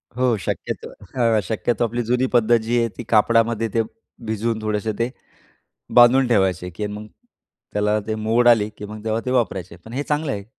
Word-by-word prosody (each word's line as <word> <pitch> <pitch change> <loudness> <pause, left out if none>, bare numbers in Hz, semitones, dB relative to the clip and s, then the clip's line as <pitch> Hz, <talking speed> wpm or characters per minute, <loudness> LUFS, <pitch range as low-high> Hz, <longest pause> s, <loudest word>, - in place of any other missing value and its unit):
हो 125 -2 +2
शक्यतो - - -4 0.3
हं, 115 -3 +3
शक्यतो 110 +4 -1
आपली 120 +2 -2
जुनी 125 +3 +1
पद्धत 120 0 +4
जी 120 +2 0
आहे 115 - +2
ती 120 - -5
कापडामध्ये 115 +1 +3
ते 115 - +3 0.5
भिजवून 110 +1 -1
थोडेसे 110 0 -1
ते 120 +2 +1 0.9
बांधून 125 +2 +7
ठेवायचे 95 -6 +1
आहे, - - -6
की 105 +5 -4
मग 105 +1 -7 0.7
त्याला 105 +1 +1
ते 110 - -1
मोड 115 +3 +2
आली, 110 -3 +5
की 105 - -7
मग 105 0 -9
तेव्हा 110 0 0
ते 125 - -2
वापरायचे. 95 -8 -1
पण 110 +6 -14
हे 140 +3 -2
चांगलं 150 0 -1
आहे 100 -4 -5
115 Hz, 185 wpm, -22 LUFS, 105-120 Hz, 0.9 s, बांधून